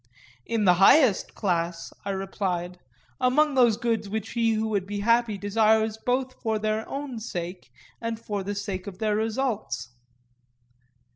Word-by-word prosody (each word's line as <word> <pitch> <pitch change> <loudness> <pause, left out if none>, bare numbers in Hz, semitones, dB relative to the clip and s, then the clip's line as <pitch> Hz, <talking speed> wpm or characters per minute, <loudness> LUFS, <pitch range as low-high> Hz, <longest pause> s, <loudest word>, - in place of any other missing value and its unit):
In 225 -2 0
the 180 - +7
highest 250 0 +5
class, 170 -4 -2
I 200 - -4
replied,—among 190 - -1
those 240 -5 +4
goods 230 -3 -1
which 220 +1 -4
he 230 -1 +2
who 220 0 0
would 200 -3 -1
be 205 0 -3
happy 230 -1 +2
desires 220 +2 +2
both 255 +1 -1
for 220 -2 0
their 215 +1 -2
own 275 -4 -5
sake 180 - -6 0.3
and 230 -1 -3
for 205 -3 -3
the 200 +2 -4
sake 200 -2 -4
of 190 -2 -7
their 215 0 0
results. 220 - -2
215 Hz, 145 wpm, -26 LUFS, 195-230 Hz, 0.3 s, the